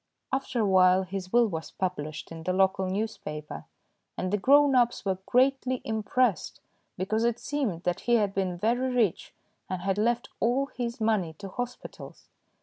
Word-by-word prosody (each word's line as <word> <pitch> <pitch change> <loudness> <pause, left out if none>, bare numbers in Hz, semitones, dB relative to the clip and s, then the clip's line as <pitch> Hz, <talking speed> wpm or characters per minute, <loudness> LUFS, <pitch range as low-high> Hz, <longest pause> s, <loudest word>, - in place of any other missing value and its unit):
After 265 -3 -1
a - - +2
while 185 -1 +5
his 185 0 -6
will 240 0 +5
was 160 -7 -4
published 155 -6 -4
in 165 0 -7
the 185 +3 -1
local 190 0 +2
newspaper, 185 -7 -5 0.5
and 185 +2 -2
the - - +3
grown 285 +5 +5
ups 240 -3 +2
were 190 -1 -1
greatly 260 0 +2
impressed, 220 -2 0 0.4
because 215 +5 0
it 235 -1 +1
seemed 240 - -3
that 180 +1 -1
he 240 - +2
had 205 -4 +1
been 185 -2 -1
very 245 +7 0
rich 230 -8 0 0.3
and 185 -1 -4
had 195 +1 0
left 235 +2 0
all 260 +4 +1
his 235 -1 -3
money 215 -7 +1
to 195 +5 -9
hospitals. 245 +5 -7
210 Hz, 165 wpm, -28 LUFS, 185-240 Hz, 0.5 s, while